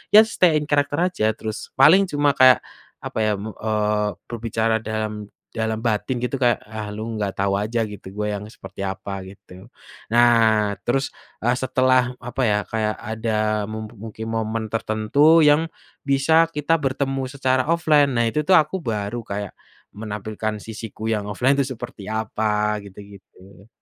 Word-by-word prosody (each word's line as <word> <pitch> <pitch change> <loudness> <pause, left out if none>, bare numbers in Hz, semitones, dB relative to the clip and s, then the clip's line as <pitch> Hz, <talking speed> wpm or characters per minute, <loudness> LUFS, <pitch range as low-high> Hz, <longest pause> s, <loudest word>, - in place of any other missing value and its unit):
ya 215 - +10
stay 180 -7 +2
in 150 - +1
character 145 0 +1
aja 180 -12 0
terus 110 -1 -6
paling 180 +9 +6
cuma 145 -3 +2
kayak, 130 -2 +6 0.4
apa - - -4
ya 110 -1 +2
me 105 +3 -6
eee, 105 -1 0 0.2
berbicara 115 -1 0
dalam 110 -1 -4 0.2
dalam 110 0 -2
batin 115 +2 0
gitu 130 +2 -2
kayak, 120 -1 +2
"Ah, 105 0 -6
lu 105 +1 -6 0.2
nggak 100 -2 -2
tahu 100 0 +1
aja 115 +2 -1
gitu 105 -2 -10
gua 105 0 -2
yang - - -9
seperti 110 - -13
apa," 100 0 -4
gitu, 95 -1 -14 0.4
nah 115 -3 +4 0.2
terus, 135 +3 0 0.3
eee, 120 - +3
setelah 130 -1 +2
apa 125 +2 -4
ya 105 0 +2
kayak 110 -1 -1
ada 110 -1 -1
mu 110 0 -5
mungkin 110 0 -9
momen 110 0 -2
tertentu 115 +9 +3
yang, 150 +2 +4 0.4
bisa 160 +4 +4
kita 155 0 0
bertemu 135 -1 -1
secara 130 0 0
offline, 155 -4 +3
nah 115 - +3
itu 115 - -1
tuh 190 - +6
aku 160 +4 +1
baru 110 - -3
kayak, 100 -2 -5 0.4
menampilkan 105 0 -4
sisiku 110 -1 -8
yang 105 -2 -1
offline 125 +7 +2
itu 130 -1 -1
seperti 115 -4 -9
apa 105 -1 -1
gitu 100 -1 -14 0.2
gitu. 100 +2 -19
110 Hz, 160 wpm, -22 LUFS, 105-135 Hz, 0.4 s, ya